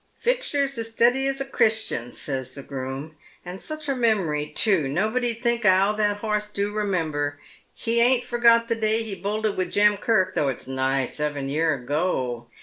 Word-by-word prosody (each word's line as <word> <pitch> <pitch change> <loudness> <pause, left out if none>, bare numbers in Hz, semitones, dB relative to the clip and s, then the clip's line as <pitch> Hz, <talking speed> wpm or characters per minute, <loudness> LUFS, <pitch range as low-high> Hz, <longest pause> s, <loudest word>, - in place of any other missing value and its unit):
" - - -41
Fixture's 285 - 0
as 225 0 -3
steady 245 +4 +2
as 275 0 -2
a 275 - -2
Christian," 220 - 0
says 130 -2 -5
the 140 - -8
groom, 135 +3 -6
" - - -30
and 180 +2 -7
Buch 310 +3 -6
a 275 - 0
memory 190 -12 +1
too, 190 -9 +1
nobody 220 - 0
'd 230 +2 -9
think 235 -1 +1
how 195 -1 +4
that 210 -1 -1
'oss 210 -1 -1
do 205 0 -2
remember. 160 -9 -1 0.4
He 235 0 +3
ain't 245 +1 +5
forgot 235 -1 +4
the 230 - +1
day 220 0 +1
he 220 -3 -5
bolted 210 +2 -2
with 185 -1 -2
Jem 210 0 +4
Kirk, 190 -3 +1
tho' 145 - +1
it's 130 - -3
nigh 130 0 0
seven 145 -1 -3
year 155 +1 +1
ago. 130 -3 -2
205 Hz, 190 wpm, -24 LUFS, 150-230 Hz, 0.4 s, ain't